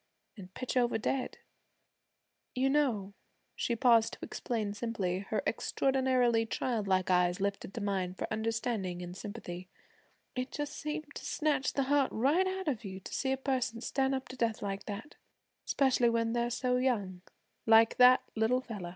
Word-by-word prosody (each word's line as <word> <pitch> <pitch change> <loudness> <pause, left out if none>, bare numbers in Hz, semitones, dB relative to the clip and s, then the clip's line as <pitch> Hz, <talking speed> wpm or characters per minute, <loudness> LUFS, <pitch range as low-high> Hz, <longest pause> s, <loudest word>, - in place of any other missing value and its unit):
an' 190 -5 -10
pitch 255 - -4
over 240 -2 +2
dead. 255 +3 -2 1.2
You 265 +1 +2
know,' 235 -10 +1 0.4
she 235 - -1
paused 230 -2 +4
to - - -9
explain 215 -4 -3
simply, 205 -5 -2
her 215 - 0
extraordinarily 255 -3 +2
childlike 200 -7 0
eyes 180 0 +3
lifted 200 -1 -2
to 230 - -3
mine 190 -3 -1
for - - -3
understanding 220 -5 -2
and 175 0 -7
sympathy, 185 -4 -7 0.7
'it 255 +1 -2
just 295 -1 -4
seems 305 +1 -4
to - - -8
snatch 295 -3 0
the 275 - +1
heart 275 0 +2
right 295 +11 +2
out 380 -1 -3
of 250 -7 -1
you 190 -2 -6
to - - -10
see 265 - 0
a 265 - +1
person 260 -3 -1
stand 270 +2 0
up 265 - -5
to 255 - -7
death 230 -3 -1
like 195 0 -4
that 215 +7 -7 0.5
'specially 255 -3 +3
when 230 0 0
they're 240 0 0
so 250 +1 0
young, 205 -8 0 0.5
like 225 0 +6
that 250 0 +7
little 230 +3 +2
fella.' 210 -8 -6
230 Hz, 165 wpm, -32 LUFS, 200-260 Hz, 1.2 s, that